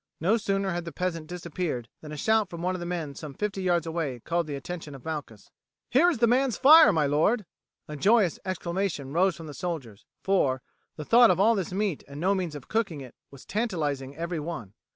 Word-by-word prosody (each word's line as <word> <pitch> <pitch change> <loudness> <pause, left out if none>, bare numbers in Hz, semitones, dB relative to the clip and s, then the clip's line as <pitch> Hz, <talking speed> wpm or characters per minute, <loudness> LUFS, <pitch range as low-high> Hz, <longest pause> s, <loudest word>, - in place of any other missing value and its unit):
No 190 +8 +3
sooner 195 -3 -1
had 175 0 -2
the 170 - -5
peasant 165 -3 -3
disappeared 170 -7 -4
than 150 - -9
a 150 - -6
shout 220 +4 +2
from 170 0 -7
one 185 +1 0
of - - -5
the 175 - -5
men 165 -5 -3
some 145 -1 -9
fifty 205 -2 -3
yards 175 -3 +1
away 160 -6 -3
called 170 +6 -1
the 145 - -4
attention 150 +1 -7
of 130 - -13
Malchus. 145 -9 -6 0.4
"Here 300 +8 +5
is 330 - -1
the 235 - +4
man's 250 +1 +2
fire, 310 -1 +8
my 160 -5 +2
lord." 165 +10 +2 0.4
A 150 - -6
joyous 195 +4 +3
exclamation 175 -6 -3
rose 185 +1 +3
from 165 - -9
the 150 - -8
soldiers, 140 - -6 0.2
for, 135 -10 +1 0.3
the 150 - -7
thought 235 +4 +7
of 180 - +2
all 220 +4 +5
this 190 -6 -2
meat 195 -4 -1
and 140 +1 -9
no 190 +4 +2
means 180 -6 -2
of 145 - -9
cooking 200 -10 -1
it 130 -3 -10 0.2
was 140 -2 -14
tantalizing 150 - -2
every 170 0 -3
one. 145 - -6
170 Hz, 215 wpm, -27 LUFS, 150-195 Hz, 0.4 s, fire